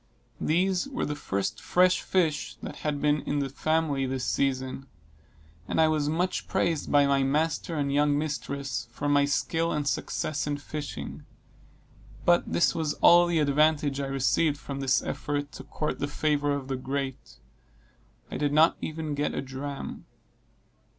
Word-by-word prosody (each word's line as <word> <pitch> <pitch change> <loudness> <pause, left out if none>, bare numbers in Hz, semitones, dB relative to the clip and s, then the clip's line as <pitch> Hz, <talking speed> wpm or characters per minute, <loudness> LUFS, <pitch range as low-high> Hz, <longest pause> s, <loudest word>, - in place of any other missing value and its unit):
These 180 - +1
were 275 -2 -2
the 150 - -2
first 100 -8 -3
fresh 180 0 +3
fish 165 -5 0
that - - -6
had 145 -2 -3
been 150 -1 +3
in 145 - -2
the 140 -1 -1
family 150 -1 0
this 130 -1 -2
season; 130 0 -1 0.8
and - - -1
I 160 -1 +5
was 150 -2 +1
much 180 +4 -1
praised 165 -3 0
by 145 -1 +5
my 140 0 +3
master 155 +4 0
and 140 -2 0
young 145 0 +3
mistresses, 140 -4 -3
for 135 +5 -4
my 145 0 +4
skill 165 +3 0
and 150 -1 -1
success 150 +2 -2
in 145 -1 -1
fishing; 145 0 -6 1.0
but 175 0 +3
this 170 - +3
was 160 -2 -1
all 175 0 +6
the 170 -1 +1
advantage 150 -1 +2
I 140 - -2
received 135 +3 +1
from 140 -1 -6
this 135 -1 +2
effort 145 0 -3
to - - -9
court 150 - -3
the 145 - -1
favor 145 0 0
of 140 -2 -2
the 135 -1 -2
great: 135 0 -4 1.0
I - - -3
did 145 -1 0
not 155 +2 +5
even 155 -1 -4
get 145 +1 -1
a - - -1
dram. 135 +1 -6
145 Hz, 165 wpm, -27 LUFS, 140-155 Hz, 1.0 s, all